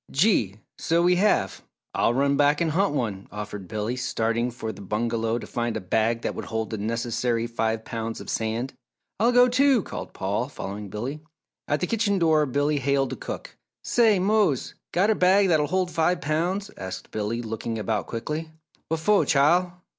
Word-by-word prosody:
"Gee! 135 Hz, -, +2 dB, 0.2 s
So 170 Hz, +1 st, +2 dB
we 180 Hz, 0 st, +4 dB
have 95 Hz, -, +2 dB, 0.3 s
I'll 120 Hz, -, +2 dB
run 140 Hz, +1 st, +2 dB
back 145 Hz, +1 st, +3 dB
and 165 Hz, -2 st, +1 dB
hunt 185 Hz, -1 st, +1 dB
one," 100 Hz, -7 st, -2 dB
offered 105 Hz, -2 st, -6 dB
Billy, 110 Hz, +5 st, -2 dB
starting 115 Hz, -1 st, 0 dB
for 115 Hz, -2 st, -5 dB
the 100 Hz, -1 st, -11 dB
bungalow 115 Hz, +3 st, -1 dB
to -, -, -6 dB
find 120 Hz, -1 st, -2 dB
a -, -, -2 dB
bag 110 Hz, +5 st, 0 dB
that -, -, -1 dB
would -, -, -6 dB
hold 110 Hz, 0 st, -3 dB
the 110 Hz, -, -3 dB
necessary 115 Hz, +2 st, -1 dB
five 115 Hz, -1 st, -2 dB
pounds 115 Hz, 0 st, -4 dB
of -, -, -9 dB
sand. 115 Hz, +4 st, -2 dB, 0.5 s
"I'll 230 Hz, +3 st, +4 dB
go, 245 Hz, 0 st, +6 dB
too!" 260 Hz, -2 st, +3 dB
called -, -, -7 dB
Paul, -, -, -2 dB
following 100 Hz, +1 st, -6 dB
Billy. 125 Hz, +9 st, -5 dB, 0.5 s
At 150 Hz, -, 0 dB
the -, -, +2 dB
kitchen 210 Hz, 0 st, +1 dB
door, 160 Hz, -4 st, +3 dB
Billy 145 Hz, +3 st, +1 dB
hailed 135 Hz, -1 st, +1 dB
the -, -, -3 dB
cook. -, -, -7 dB, 0.3 s
"Say, 225 Hz, -4 st, +4 dB
Mose, 195 Hz, -, +1 dB, 0.2 s
got 195 Hz, +5 st, +3 dB
a -, -, +5 dB
bag 190 Hz, 0 st, +4 dB
that'll 155 Hz, -3 st, +3 dB
hold 185 Hz, +2 st, 0 dB
five 170 Hz, +2 st, +1 dB
pounds?" 175 Hz, +7 st, -1 dB
asked 95 Hz, -1 st, -7 dB
Billy, 110 Hz, +3 st, -2 dB
looking 115 Hz, 0 st, -4 dB
about 110 Hz, -1 st, -2 dB
quickly. 150 Hz, +8 st, -4 dB, 0.4 s
"Wha'fo', 165 Hz, +6 st, +3 dB
Chile?" 170 Hz, +5 st, +3 dB
135 Hz, 180 wpm, -25 LUFS, 110-175 Hz, 0.5 s, go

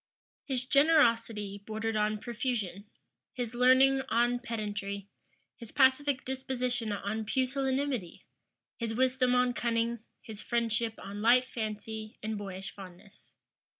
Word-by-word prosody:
His 255 Hz, -3 st, -1 dB
generosity 230 Hz, -9 st, +3 dB
bordered 220 Hz, +1 st, -3 dB
on 215 Hz, 0 st, +1 dB
profusion, 215 Hz, -4 st, -3 dB, 0.4 s
his 245 Hz, -2 st, -4 dB
learning 260 Hz, +2 st, +5 dB
on 240 Hz, +1 st, +2 dB
pedantry, 205 Hz, -4 st, -4 dB, 0.5 s
his 230 Hz, -3 st, -10 dB
pacific 270 Hz, 0 st, +3 dB
disposition 250 Hz, -3 st, -2 dB
on 205 Hz, +2 st, -2 dB
pusillanimity, 260 Hz, -3 st, -1 dB, 0.5 s
his 230 Hz, -1 st, -3 dB
wisdom 255 Hz, 0 st, +2 dB
on 250 Hz, 0 st, +3 dB
cunning, 235 Hz, 0 st, 0 dB, 0.2 s
his 215 Hz, -2 st, -8 dB
friendship 230 Hz, -1 st, 0 dB
on 200 Hz, +2 st, -7 dB
light 245 Hz, +3 st, +5 dB
fancy 220 Hz, -2 st, -5 dB
and 220 Hz, 0 st, -2 dB
boyish 195 Hz, -2 st, -6 dB
fondness. 195 Hz, +1 st, -14 dB
230 Hz, 115 wpm, -30 LUFS, 210-255 Hz, 0.5 s, learning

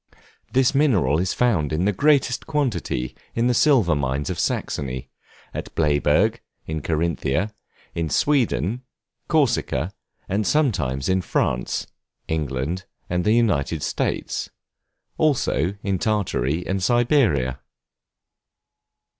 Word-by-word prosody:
This 130 Hz, +1 st, +3 dB
mineral 100 Hz, -, +3 dB
is 90 Hz, +1 st, -1 dB
found 95 Hz, -13 st, +1 dB
in 80 Hz, +4 st, 0 dB
the 105 Hz, -, +3 dB
greatest 140 Hz, +2 st, +2 dB
quantity 130 Hz, -, -1 dB, 0.2 s
in 115 Hz, -, +1 dB
the 125 Hz, -, +3 dB
silver 120 Hz, -, +4 dB
mines 70 Hz, +3 st, -1 dB
of 90 Hz, -, -4 dB
Saxony; 65 Hz, -2 st, -2 dB, 0.4 s
at -, -, -6 dB
Bleyburg, 75 Hz, +9 st, +2 dB, 0.3 s
in 80 Hz, -1 st, -3 dB
Carinthia; 85 Hz, +4 st, 0 dB, 0.4 s
in 85 Hz, -1 st, -2 dB
Sweden, 120 Hz, -, +1 dB, 0.5 s
Corsica, 120 Hz, -, +1 dB, 0.4 s
and 100 Hz, +2 st, 0 dB
sometimes 75 Hz, -, +1 dB
in 95 Hz, 0 st, +2 dB
France, 60 Hz, -7 st, -1 dB, 0.4 s
England, 80 Hz, +3 st, -2 dB, 0.3 s
and 90 Hz, 0 st, +1 dB
the 105 Hz, -, +3 dB
United 85 Hz, -10 st, +1 dB
States; -, -, -2 dB, 0.7 s
also 125 Hz, -, +1 dB
in 95 Hz, -2 st, 0 dB
Tartary 90 Hz, -, 0 dB
and 95 Hz, 0 st, -1 dB
Siberia. 110 Hz, -, +2 dB
90 Hz, 110 wpm, -23 LUFS, 75-120 Hz, 0.7 s, silver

